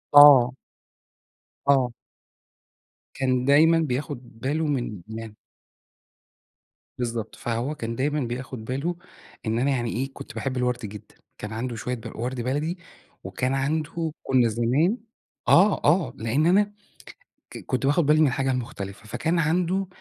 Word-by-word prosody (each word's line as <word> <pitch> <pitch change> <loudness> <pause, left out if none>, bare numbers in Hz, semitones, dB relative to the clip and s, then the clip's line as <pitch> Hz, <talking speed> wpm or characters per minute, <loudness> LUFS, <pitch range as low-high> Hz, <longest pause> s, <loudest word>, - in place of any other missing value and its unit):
آه. 135 -4 +9 1.2
آه. 130 -3 +4 1.2
كان 130 -1 0
دايمًا 160 +4 +5
بياخُد 130 -5 -4
باله 150 +6 -1
من 120 -9 -2
م 110 -1 -7 1.6
بالضبط. 115 -3 -3
فهو 120 +6 -3
كان 115 -4 -4
دايماً 145 +4 0
بياخُد 125 -2 -5
باله 140 +8 -2 0.5
إن 110 +2 0
أنا 140 +2 +2
يعني 120 -3 -1
إيه، 135 +4 -3
كنت - - -10
باحب 130 -1 -3
الوَرْد 125 0 0
جدًا. 105 0 -10 0.2
كان 105 +1 -6
عنده 120 +2 -3
شوية 125 +2 -3
ب 115 -1 -8
وَرْد 125 +2 -3
بلدي 145 +8 -1 0.5
وكان 130 +1 -2
عنده 155 +4 -1
كُنّا 130 -3 +3
زمان 125 - +1 0.5
آه، 195 +3 +5
آه. 165 +4 +3
لإن 120 +8 0
أنا 205 +4 +4 0.8
ك - - -9
كنت 130 +1 -1
باخُد 145 +3 +3
بالي 155 +2 +4
من 155 - +6
الحاجة 135 0 0
المختلفة، 100 -5 -5
فكان 165 +9 -1
عنده 175 +4 +1
130 Hz, 135 wpm, -25 LUFS, 120-150 Hz, 1.6 s, آه